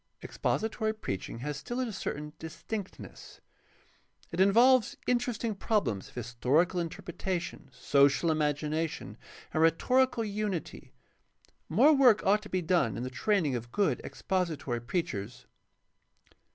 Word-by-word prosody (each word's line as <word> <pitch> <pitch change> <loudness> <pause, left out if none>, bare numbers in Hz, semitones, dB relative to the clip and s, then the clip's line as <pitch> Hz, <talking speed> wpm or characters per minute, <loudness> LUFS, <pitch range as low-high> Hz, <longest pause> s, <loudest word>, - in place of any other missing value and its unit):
Expository 220 0 -1
preaching 100 - -5
has 145 +1 -3
still 240 +11 -5
a 245 -4 -2
certain 150 -5 -5
distinctness. 190 +5 -8 0.9
It 170 - -4
involves 235 +5 +5
interesting 240 -2 0
problems 195 - -1
of - - -21
historical 130 - +1
interpretation, 175 -2 -4
social 140 +5 +3
imagination, 155 +1 -2 0.3
and 155 - +1
rhetorical 250 - +3
unity. 205 -4 -4 0.8
More 310 - +6
work 250 -7 +5
ought 205 +2 +4
to 210 - -11
be 185 -1 -1
done 170 -9 +1
in 120 - -3
the 130 - -4
training 160 +2 +1
of 120 -1 -5
good 200 +6 +1
expository 160 -10 -2
preachers. 125 - -4
175 Hz, 115 wpm, -30 LUFS, 145-215 Hz, 0.9 s, More